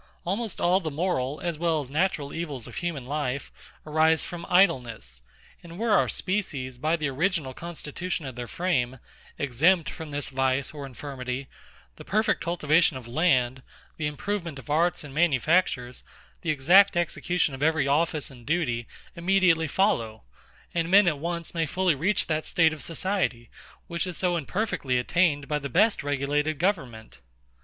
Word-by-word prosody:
Almost 205 Hz, +3 st, -2 dB
all 180 Hz, +2 st, +3 dB
the 165 Hz, -5 st, -3 dB
moral, 150 Hz, -3 st, -1 dB
as 170 Hz, -3 st, -3 dB
well 165 Hz, -2 st, +1 dB
as 135 Hz, -3 st, -7 dB
natural 155 Hz, -3 st, 0 dB
evils 150 Hz, -8 st, -5 dB
of -, -, -10 dB
human 170 Hz, -7 st, -3 dB
life, 140 Hz, -1 st, -3 dB, 0.3 s
arise 160 Hz, +1 st, +3 dB
from 170 Hz, -1 st, -7 dB
idleness; 165 Hz, -, +2 dB, 0.4 s
and 170 Hz, 0 st, -11 dB
were 225 Hz, +2 st, 0 dB
our 205 Hz, -, +4 dB
species, 140 Hz, -11 st, -2 dB
by 155 Hz, +4 st, +1 dB
the 155 Hz, -3 st, -2 dB
original 150 Hz, 0 st, 0 dB
constitution 170 Hz, +1 st, -5 dB
of 130 Hz, -2 st, -6 dB
their 120 Hz, -1 st, -5 dB
frame, 130 Hz, -, -1 dB, 0.4 s
exempt 150 Hz, +5 st, +2 dB
from 160 Hz, -1 st, -8 dB
this 145 Hz, -1 st, -4 dB
vice 135 Hz, +1 st, 0 dB
or 145 Hz, -2 st, -6 dB
infirmity, 130 Hz, 0 st, -6 dB, 0.5 s
the -, -, -10 dB
perfect 215 Hz, +2 st, +1 dB
cultivation 165 Hz, -3 st, +2 dB
of 125 Hz, -2 st, -10 dB
land, 130 Hz, -2 st, +2 dB, 0.4 s
the 155 Hz, -, -1 dB
improvement 170 Hz, +1 st, -3 dB
of 135 Hz, +2 st, -8 dB
arts 170 Hz, +3 st, +2 dB
and 145 Hz, -2 st, -10 dB
manufactures, 150 Hz, -4 st, +1 dB, 0.4 s
the 170 Hz, -, -3 dB
exact 175 Hz, +7 st, +5 dB
execution 175 Hz, -2 st, 0 dB
of 135 Hz, -, -7 dB
every 155 Hz, -2 st, +2 dB
office 155 Hz, 0 st, +1 dB
and 125 Hz, -2 st, -15 dB
duty, 130 Hz, -8 st, 0 dB, 0.3 s
immediately 175 Hz, -2 st, +3 dB
follow; 115 Hz, -, 0 dB, 0.5 s
and 170 Hz, -1 st, 0 dB
men 195 Hz, +1 st, +6 dB
at 150 Hz, -4 st, +1 dB
once 170 Hz, +1 st, -4 dB
may 165 Hz, -2 st, 0 dB
fully 185 Hz, +2 st, +2 dB
reach 180 Hz, +8 st, +1 dB
that 155 Hz, -1 st, -1 dB
state 160 Hz, -2 st, +3 dB
of 155 Hz, -, -7 dB
society, 165 Hz, -, -2 dB, 0.3 s
which 170 Hz, +2 st, -2 dB
is 180 Hz, -, -4 dB
so 180 Hz, -2 st, +1 dB
imperfectly 165 Hz, -, -1 dB
attained 145 Hz, +2 st, +1 dB
by 150 Hz, -1 st, 0 dB
the 140 Hz, -1 st, -5 dB
best 210 Hz, -, +3 dB
regulated 145 Hz, +2 st, 0 dB
government. 135 Hz, -, -2 dB
155 Hz, 160 wpm, -26 LUFS, 135-175 Hz, 0.5 s, men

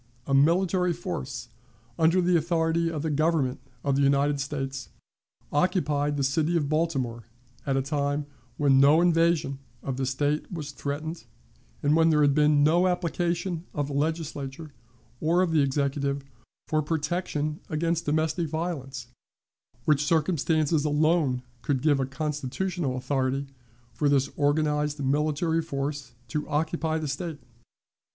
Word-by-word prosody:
A 135 Hz, -, -2 dB
military 175 Hz, +5 st, +3 dB
force, 90 Hz, -, -5 dB, 0.5 s
under 165 Hz, +3 st, +4 dB
the 180 Hz, 0 st, +3 dB
authority 165 Hz, 0 st, +1 dB
of 155 Hz, -3 st, -4 dB
the 160 Hz, -, -1 dB
Government 150 Hz, -3 st, +1 dB, 0.2 s
of 140 Hz, -2 st, +1 dB
the 140 Hz, -, +2 dB
United 140 Hz, +1 st, +3 dB
States, 135 Hz, -1 st, -4 dB, 0.6 s
occupied 145 Hz, -3 st, +1 dB
the 140 Hz, -, 0 dB
city 155 Hz, +5 st, +1 dB
of 150 Hz, -3 st, 0 dB
Baltimore 135 Hz, -7 st, -1 dB, 0.4 s
at 135 Hz, -1 st, +1 dB
a 135 Hz, -, +1 dB
time 145 Hz, 0 st, -1 dB, 0.3 s
when 140 Hz, -2 st, +4 dB
no 145 Hz, +4 st, +6 dB
invasion 165 Hz, -5 st, +2 dB, 0.2 s
of 135 Hz, -2 st, -3 dB
the 135 Hz, -1 st, -1 dB
State 145 Hz, +3 st, -1 dB
was 155 Hz, -5 st, -5 dB
threatened, 150 Hz, +4 st, -5 dB, 0.6 s
and 145 Hz, +1 st, +4 dB
when 165 Hz, 0 st, +5 dB
there 150 Hz, -2 st, +4 dB
had 140 Hz, -1 st, +4 dB
been 150 Hz, 0 st, +4 dB
no 170 Hz, +5 st, +4 dB
application 175 Hz, 0 st, -1 dB
of 145 Hz, -2 st, -1 dB
the -, -, -4 dB
Legislature, 150 Hz, -1 st, -3 dB, 0.5 s
or 170 Hz, +4 st, +3 dB
of 175 Hz, -, 0 dB
the 155 Hz, -2 st, +4 dB
Executive, 140 Hz, 0 st, 0 dB, 0.4 s
for 155 Hz, 0 st, +1 dB
protection 155 Hz, -1 st, -2 dB
against 165 Hz, +1 st, -1 dB
domestic 160 Hz, +2 st, +1 dB
violence, 145 Hz, -6 st, -4 dB, 0.8 s
which 150 Hz, -1 st, +3 dB
circumstances 155 Hz, -1 st, +1 dB
alone 150 Hz, -3 st, +2 dB, 0.2 s
could 135 Hz, -3 st, -1 dB
give 145 Hz, -3 st, +3 dB
a 135 Hz, -, 0 dB
constitutional 150 Hz, +1 st, -2 dB
authority 135 Hz, +1 st, -1 dB, 0.5 s
for 145 Hz, -, +1 dB
this 140 Hz, -1 st, +2 dB
organized 150 Hz, 0 st, +1 dB
military 155 Hz, +4 st, +1 dB
force 140 Hz, -2 st, -4 dB
to 150 Hz, +6 st, -3 dB
occupy 160 Hz, +1 st, 0 dB
the 155 Hz, -1 st, -3 dB
State. 150 Hz, +2 st, -4 dB
150 Hz, 140 wpm, -27 LUFS, 140-165 Hz, 0.8 s, no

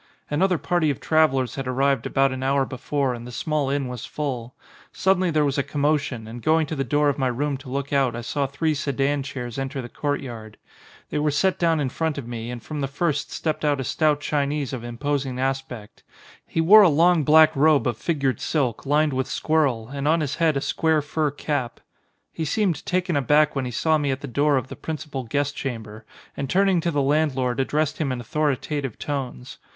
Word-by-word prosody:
Another 180 Hz, +4 st, +2 dB
party 175 Hz, -1 st, +1 dB
of 140 Hz, -, -2 dB
travellers 135 Hz, -6 st, +2 dB
had 135 Hz, -2 st, -5 dB
arrived 135 Hz, 0 st, +1 dB
about 135 Hz, 0 st, +2 dB
an 130 Hz, 0 st, -4 dB
hour 135 Hz, +1 st, +2 dB
before 130 Hz, +1 st, -2 dB
and 120 Hz, 0 st, -8 dB
the -, -, -8 dB
small 150 Hz, +3 st, -1 dB
inn 140 Hz, -1 st, -1 dB
was 125 Hz, -2 st, -6 dB
full. 130 Hz, -5 st, -4 dB, 0.4 s
Suddenly 185 Hz, -1 st, +2 dB
there 155 Hz, -2 st, +2 dB
was 140 Hz, 0 st, 0 dB
a -, -, +1 dB
commotion 145 Hz, -5 st, -1 dB
and 120 Hz, +2 st, -8 dB
going 160 Hz, +2 st, +3 dB
to 155 Hz, -, -5 dB
the 135 Hz, -, -1 dB
door 145 Hz, +3 st, +1 dB
of 140 Hz, 0 st, 0 dB
my 130 Hz, -, +2 dB
room 140 Hz, +4 st, -1 dB
to 135 Hz, -1 st, -12 dB
look 140 Hz, +2 st, -3 dB
out 135 Hz, -4 st, +2 dB
I 120 Hz, -, -4 dB
saw 140 Hz, +4 st, -1 dB
three 155 Hz, +4 st, -1 dB
sedan 140 Hz, 0 st, 0 dB
chairs 130 Hz, -3 st, -6 dB
enter 135 Hz, +1 st, -3 dB
the 120 Hz, -2 st, -6 dB
court 145 Hz, +2 st, -2 dB
yard. 110 Hz, -5 st, -9 dB, 0.5 s
They 150 Hz, -, 0 dB
were 150 Hz, 0 st, +2 dB
set 185 Hz, +6 st, +1 dB
down 165 Hz, -2 st, +2 dB
in 140 Hz, -3 st, 0 dB
front 160 Hz, +3 st, -2 dB
of 135 Hz, -4 st, -6 dB
me 120 Hz, -1 st, -5 dB
and 120 Hz, -2 st, -6 dB
from 150 Hz, -2 st, -5 dB
the 135 Hz, -, 0 dB
first 150 Hz, +1 st, -1 dB
stepped 155 Hz, -1 st, -3 dB
out 145 Hz, -2 st, +2 dB
a -, -, -1 dB
stout 150 Hz, +2 st, +1 dB
Chinese 145 Hz, -2 st, -1 dB
of 125 Hz, -3 st, -5 dB
im 120 Hz, 0 st, -7 dB
posing 135 Hz, -2 st, -2 dB
aspect. 130 Hz, -5 st, -4 dB, 0.5 s
He 165 Hz, -, 0 dB
wore 205 Hz, +7 st, +8 dB
a 195 Hz, -, +7 dB
long 165 Hz, +2 st, +4 dB
black 155 Hz, +2 st, +6 dB
robe 150 Hz, +1 st, +4 dB
of 120 Hz, -3 st, 0 dB
fig 150 Hz, +6 st, -2 dB
ured 135 Hz, -2 st, +1 dB
silk, 135 Hz, -5 st, -1 dB
lined 150 Hz, +1 st, +2 dB
with 130 Hz, +1 st, -1 dB
squirrel, 135 Hz, -7 st, 0 dB
and 140 Hz, +1 st, -3 dB
on 160 Hz, +1 st, +3 dB
his 150 Hz, -1 st, -2 dB
head 160 Hz, -3 st, +2 dB
a -, -, -1 dB
square 160 Hz, -1 st, +1 dB
fur 150 Hz, +1 st, 0 dB
cap. 140 Hz, -3 st, -3 dB, 0.5 s
He 165 Hz, -, -4 dB
seemed 180 Hz, +2 st, 0 dB
taken 180 Hz, -2 st, 0 dB
aback 150 Hz, +2 st, +3 dB
when 135 Hz, -2 st, -1 dB
he -, -, -3 dB
saw 155 Hz, +5 st, +2 dB
me 145 Hz, -1 st, -1 dB
at 135 Hz, 0 st, -2 dB
the 145 Hz, -, -5 dB
door 145 Hz, +2 st, +2 dB
of 130 Hz, -1 st, -2 dB
the -, -, -8 dB
principal 150 Hz, -4 st, -5 dB
guest 145 Hz, +4 st, -1 dB
chamber 110 Hz, -6 st, -6 dB, 0.3 s
and 140 Hz, -1 st, -4 dB
turning 190 Hz, 0 st, +3 dB
to 170 Hz, -, 0 dB
the 145 Hz, -4 st, +1 dB
landlord 135 Hz, -4 st, +1 dB
addressed 150 Hz, +3 st, 0 dB
him 145 Hz, -4 st, 0 dB
in 125 Hz, -, -3 dB
authoritative 140 Hz, 0 st, -2 dB
tones. 130 Hz, -3 st, -5 dB
140 Hz, 220 wpm, -24 LUFS, 130-155 Hz, 0.5 s, wore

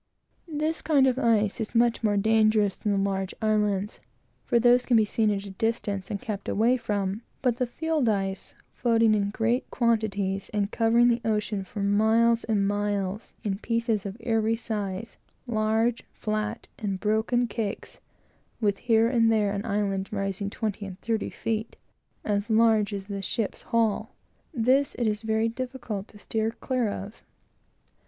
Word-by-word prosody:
This 310 Hz, +2 st, -1 dB
kind 295 Hz, -4 st, +4 dB
of 260 Hz, 0 st, +2 dB
ice 220 Hz, -3 st, +2 dB
is 220 Hz, -, -5 dB
much 235 Hz, 0 st, +3 dB
more 205 Hz, -2 st, +2 dB
dangerous 215 Hz, -1 st, +3 dB
than 210 Hz, -, -2 dB
the 200 Hz, -, +1 dB
large 195 Hz, -1 st, -1 dB
islands, 210 Hz, -2 st, 0 dB, 0.5 s
for -, -, +3 dB
those 245 Hz, +1 st, +5 dB
can 245 Hz, -2 st, +3 dB
be 220 Hz, -, +4 dB
seen 215 Hz, +1 st, +1 dB
at 200 Hz, -1 st, -1 dB
a 200 Hz, -, -7 dB
distance, 200 Hz, -2 st, -2 dB
and 200 Hz, -, -3 dB
kept 210 Hz, -4 st, -5 dB
away 230 Hz, +4 st, +3 dB
from; 205 Hz, -3 st, -2 dB, 0.2 s
but 245 Hz, -3 st, +2 dB
the 250 Hz, -, 0 dB
field 310 Hz, -1 st, 0 dB
ice, 195 Hz, -2 st, -2 dB, 0.2 s
floating 230 Hz, -2 st, +3 dB
in 200 Hz, -1 st, +1 dB
great 230 Hz, +4 st, 0 dB
quantities, 205 Hz, -5 st, 0 dB
and 205 Hz, 0 st, 0 dB
covering 230 Hz, +1 st, +4 dB
the 235 Hz, 0 st, +1 dB
ocean 210 Hz, -2 st, -1 dB
for 200 Hz, +2 st, -6 dB
miles 220 Hz, +3 st, +3 dB
and 205 Hz, -3 st, +1 dB
miles, 205 Hz, 0 st, -2 dB
in 200 Hz, -3 st, -2 dB
pieces 230 Hz, -3 st, 0 dB
of 195 Hz, +2 st, -7 dB
every 225 Hz, -1 st, +1 dB
size 210 Hz, -2 st, -4 dB, 0.3 s
large, 225 Hz, 0 st, +1 dB
flat, 215 Hz, +1 st, -3 dB
and 195 Hz, -3 st, -2 dB
broken 220 Hz, +4 st, +1 dB
cakes, 220 Hz, -3 st, -4 dB, 0.6 s
with 205 Hz, -3 st, +1 dB
here 225 Hz, -1 st, +3 dB
and 230 Hz, -2 st, +3 dB
there 210 Hz, -2 st, +2 dB
an 200 Hz, 0 st, -3 dB
island 200 Hz, -2 st, -1 dB
rising 195 Hz, -1 st, -2 dB
twenty 210 Hz, 0 st, -3 dB
and 190 Hz, -1 st, -8 dB
thirty 225 Hz, -2 st, -1 dB
feet, 225 Hz, 0 st, -3 dB, 0.5 s
and 205 Hz, -1 st, +1 dB
as 205 Hz, +3 st, -4 dB
large 220 Hz, -1 st, +4 dB
as 200 Hz, -1 st, -4 dB
the 200 Hz, -1 st, -5 dB
ship's 215 Hz, +1 st, -2 dB
hull; 230 Hz, -3 st, 0 dB, 0.4 s
this, 265 Hz, +1 st, +2 dB
it 240 Hz, -, -1 dB
is 210 Hz, 0 st, 0 dB
very 220 Hz, 0 st, +1 dB
difficult 230 Hz, -4 st, -5 dB
to 210 Hz, -, -16 dB
sheer 220 Hz, +1 st, -1 dB
clear 245 Hz, 0 st, -1 dB
of. 200 Hz, +2 st, -7 dB
220 Hz, 165 wpm, -26 LUFS, 200-230 Hz, 0.6 s, those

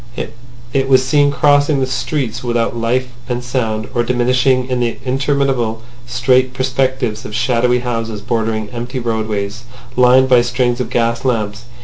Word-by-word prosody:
It 135 Hz, -1 st, +1 dB
was 130 Hz, -1 st, +5 dB
seen 145 Hz, +2 st, +3 dB
crossing 145 Hz, +1 st, +3 dB
the 130 Hz, -, +1 dB
streets 130 Hz, -2 st, -2 dB
without 120 Hz, -1 st, 0 dB
life 120 Hz, +2 st, 0 dB, 0.2 s
and 125 Hz, 0 st, -2 dB
sound, 115 Hz, -4 st, -2 dB
or 120 Hz, -, +1 dB
diminishing 125 Hz, +1 st, +2 dB
in 125 Hz, -1 st, -1 dB
the 120 Hz, -1 st, -1 dB
interminable 130 Hz, -4 st, 0 dB, 0.2 s
straight 125 Hz, +1 st, +2 dB
perspectives 130 Hz, -3 st, -1 dB
of 105 Hz, -, -7 dB
shadowy 125 Hz, 0 st, +2 dB
houses 115 Hz, -3 st, -3 dB
bordering 110 Hz, 0 st, -2 dB
empty 120 Hz, +2 st, -5 dB
roadways 110 Hz, -2 st, -2 dB, 0.3 s
lined 125 Hz, +1 st, +5 dB
by 125 Hz, -2 st, +5 dB
strings 120 Hz, 0 st, 0 dB
of 120 Hz, -, -3 dB
gas 115 Hz, -1 st, 0 dB
lamps. 110 Hz, -3 st, -1 dB
125 Hz, 145 wpm, -17 LUFS, 115-130 Hz, 0.3 s, was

